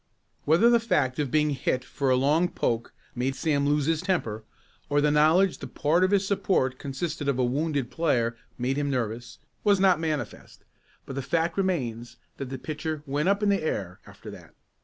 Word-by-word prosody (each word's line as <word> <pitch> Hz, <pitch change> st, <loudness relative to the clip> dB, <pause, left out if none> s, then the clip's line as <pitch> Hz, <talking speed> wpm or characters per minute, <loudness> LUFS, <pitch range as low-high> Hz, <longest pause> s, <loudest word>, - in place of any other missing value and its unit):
Whether 165 Hz, +10 st, +5 dB
the 235 Hz, -, +5 dB
fact 145 Hz, -, 0 dB
of 145 Hz, -3 st, 0 dB
being 150 Hz, +2 st, +2 dB
hit 130 Hz, -2 st, -1 dB
for 135 Hz, 0 st, -2 dB
a 130 Hz, -, +4 dB
long 150 Hz, +7 st, +2 dB
poke 115 Hz, -7 st, -2 dB, 0.2 s
made 130 Hz, +2 st, -2 dB
Sam 145 Hz, -2 st, 0 dB
lose 145 Hz, -1 st, +2 dB
his 160 Hz, 0 st, +1 dB
temper, 140 Hz, -, -2 dB, 0.5 s
or 145 Hz, 0 st, +2 dB
the 150 Hz, 0 st, +3 dB
knowledge 160 Hz, +6 st, +4 dB
that -, -, -9 dB
part 165 Hz, +5 st, +2 dB
of 185 Hz, -, +3 dB
his 200 Hz, -1 st, +2 dB
support 190 Hz, -10 st, 0 dB
consisted 145 Hz, +2 st, -4 dB
of 140 Hz, -3 st, +1 dB
a 130 Hz, -, +2 dB
wounded 140 Hz, 0 st, -1 dB
player 120 Hz, -8 st, 0 dB, 0.2 s
made 130 Hz, +3 st, -1 dB
him 145 Hz, -1 st, 0 dB
nervous, 120 Hz, -2 st, -3 dB, 0.3 s
was 205 Hz, -2 st, +4 dB
not 190 Hz, -4 st, +4 dB
manifest, 155 Hz, -8 st, -5 dB, 0.4 s
but -, -, -7 dB
the 135 Hz, -, -2 dB
fact 165 Hz, +5 st, 0 dB
remains 120 Hz, -, -2 dB, 0.2 s
that 135 Hz, -2 st, -5 dB
the 135 Hz, -, -5 dB
pitcher 155 Hz, +2 st, -5 dB
"went 145 Hz, +5 st, 0 dB
up 200 Hz, +1 st, +1 dB
in 205 Hz, -, +3 dB
the 200 Hz, -1 st, +2 dB
air" 95 Hz, -, -3 dB
after -, -, -11 dB
that. -, -, -14 dB
145 Hz, 195 wpm, -26 LUFS, 130-170 Hz, 0.5 s, Whether